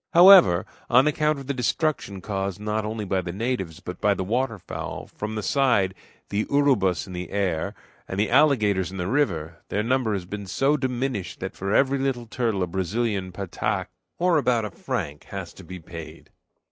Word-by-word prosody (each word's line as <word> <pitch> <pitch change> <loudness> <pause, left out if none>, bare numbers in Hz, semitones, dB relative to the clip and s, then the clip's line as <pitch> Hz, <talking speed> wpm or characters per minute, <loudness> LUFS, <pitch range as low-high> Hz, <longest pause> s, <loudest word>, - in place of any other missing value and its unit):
However, 175 - +8 0.2
on 125 +3 +6
account 150 0 +2
of 135 - -8
the 140 - -2
destruction 125 - -1
caused 100 -1 -3
not 105 +1 -2
only 110 0 -3
by 95 -1 0
the 85 -1 -5
natives, 95 -5 -3
but 90 0 -8
by 105 -1 +3
the 95 - -2
water 115 +3 -1
fowl - - -6
from 105 +1 -6
the 105 - -3
side, 120 -9 +2 0.4
the 105 +2 0
urubus 130 - +2
in 95 - -9
the 90 -1 -5
air, 95 -6 -1 0.3
and 95 - -4
the 105 - +1
alligators 110 -9 +4
in 95 - -8
the 90 - -2
river, 85 - 0
their 105 - 0
number 120 -2 +1
has 95 -3 -3
been 100 +1 -6
so 135 +9 +2
diminished 125 -8 -2
that 95 - -4
for 95 +1 -3
every 135 +4 +3
little 130 -3 -1
turtle 115 -4 -1
a - - +2
Brazilian 95 +2 -1
pataque, 95 -1 -2 0.3
or 175 -2 +3
about 120 -5 +1
a 105 - -5
franc, 75 -3 -4
has - - -7
to - - -13
be 95 - -8
paid. 80 0 -10
105 Hz, 190 wpm, -25 LUFS, 95-130 Hz, 0.4 s, However